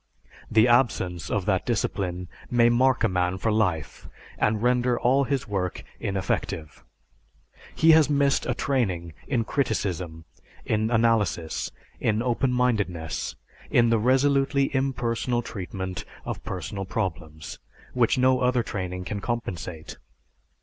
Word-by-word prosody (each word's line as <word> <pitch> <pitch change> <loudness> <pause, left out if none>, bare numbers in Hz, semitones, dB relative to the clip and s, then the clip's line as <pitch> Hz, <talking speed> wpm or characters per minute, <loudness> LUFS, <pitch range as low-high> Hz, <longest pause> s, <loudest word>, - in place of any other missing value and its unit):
The 110 +2 +5
absence 95 - +1
of 100 -3 -1
that 95 -3 +1
discipline 90 -5 -2 0.2
may 120 -1 +4
mark 130 +2 +3
a - - +5
man 90 0 0
for 110 +4 0
life 90 -9 -1 0.3
and 105 +1 +1
render 125 0 +2
all 135 +3 +3
his 135 -2 -1
work 95 -3 -2 0.2
ineffective. 95 -5 -3 0.9
He 160 +1 +6
has 155 -2 +6
missed 140 -1 +2
a 125 - 0
training 95 - -1
in 125 -5 +1
criticism, 90 - -2 0.4
in 110 0 +1
analysis, 110 -8 +1 0.3
in 110 +1 +1
open 125 +1 +1
mindedness, 100 -11 -1 0.3
in 120 -1 +4
the 115 - +3
resolutely 135 +3 +2
impersonal 120 -2 0
treatment 95 -3 -5 0.2
of - - -5
personal 95 +2 -5
problems, 85 -6 -4 0.3
which 125 -1 +2
no 130 0 +4
other 125 -1 +2
training 90 -3 -4
can 105 +1 -3
compensate. 90 -8 -5
110 Hz, 125 wpm, -26 LUFS, 90-125 Hz, 0.9 s, He